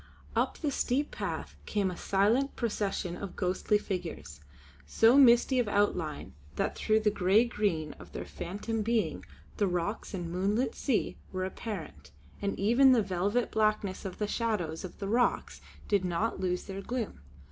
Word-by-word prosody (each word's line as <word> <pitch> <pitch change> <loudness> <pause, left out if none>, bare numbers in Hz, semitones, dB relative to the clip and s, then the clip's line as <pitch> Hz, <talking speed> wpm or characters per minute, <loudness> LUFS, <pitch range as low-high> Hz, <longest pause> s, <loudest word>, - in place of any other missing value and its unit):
Up - - +1
the 300 -3 -1
steep 270 +2 0
path - - -4
came 200 -3 0
a - - -6
silent 215 +10 +1
procession 200 -6 -2
of 195 +1 -7
ghostly 190 +3 +1
figures, 180 - -5 0.5
so 225 - +5
misty 255 -1 +6
of 240 - +1
outline 180 - 0 0.2
that - - -1
through 220 0 +2
the 210 -1 +3
grey 200 +3 +4
green 195 -10 -1
of - - -12
their - - -5
phantom 215 +4 -4
being 210 - 0 0.3
the 205 - +2
rocks 180 +4 -2
and 175 -2 -4
moonlit 205 +7 0
sea 260 -6 -1
were 185 -1 -2
apparent, 185 - -6 0.3
and 200 -1 -1
even 245 +6 +6
the 230 -4 +3
velvet 200 +5 0
blackness 215 -3 0
of 190 -3 -6
the 210 - 0
shadows 205 -9 -1
of 185 - -8
the 195 - -4
rocks 240 +4 +1 0.3
did 200 -3 +2
not 185 +5 -1
lose 180 -1 -1
their 195 0 -6
gloom. 240 +1 -4
205 Hz, 160 wpm, -30 LUFS, 180-225 Hz, 0.5 s, misty